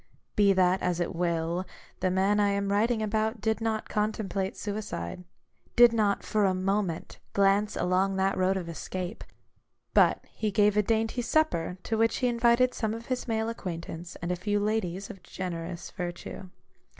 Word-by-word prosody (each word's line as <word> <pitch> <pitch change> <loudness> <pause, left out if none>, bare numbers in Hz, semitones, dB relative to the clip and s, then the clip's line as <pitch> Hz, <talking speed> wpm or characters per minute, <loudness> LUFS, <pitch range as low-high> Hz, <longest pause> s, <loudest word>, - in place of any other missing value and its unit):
Be 205 -1 +5
that 185 -1 +3
as 180 -1 0
it 175 - -1
will, 170 0 0 0.4
the 185 - +1
man 195 +3 +2
I 205 -1 +4
am 200 0 0
writing 220 +2 +2
about 220 +2 0
did 220 +2 0
not 220 -1 -1
contemplate 210 -2 -2
suicide; 200 - -4 0.5
did 240 -1 +8
not, 210 -3 +1
for 215 -1 +1
a 190 -2 +3
moment, 190 -2 -1
glance 200 +2 +3
along 190 +2 +1
that 190 +1 +1
road 185 +1 +2
of 180 -3 -4
escape. 180 +4 -5 0.7
But - - +4
he 215 - -2
gave 205 0 +3
a 210 - +5
dainty 225 +3 0
supper, 230 - +1
to 225 -1 -1
which 225 0 +3
he 255 - +1
invited 240 +1 +3
some 220 -1 -2
of 230 +1 -8
his 250 - -5
male 220 -1 0
acquaintance, 170 -5 -6
and 175 - -1
a - - +1
few 205 +3 0
ladies 200 -3 -1
of 195 - -13
generous 175 -1 -5
virtue. 180 0 -6
200 Hz, 170 wpm, -28 LUFS, 180-220 Hz, 0.7 s, did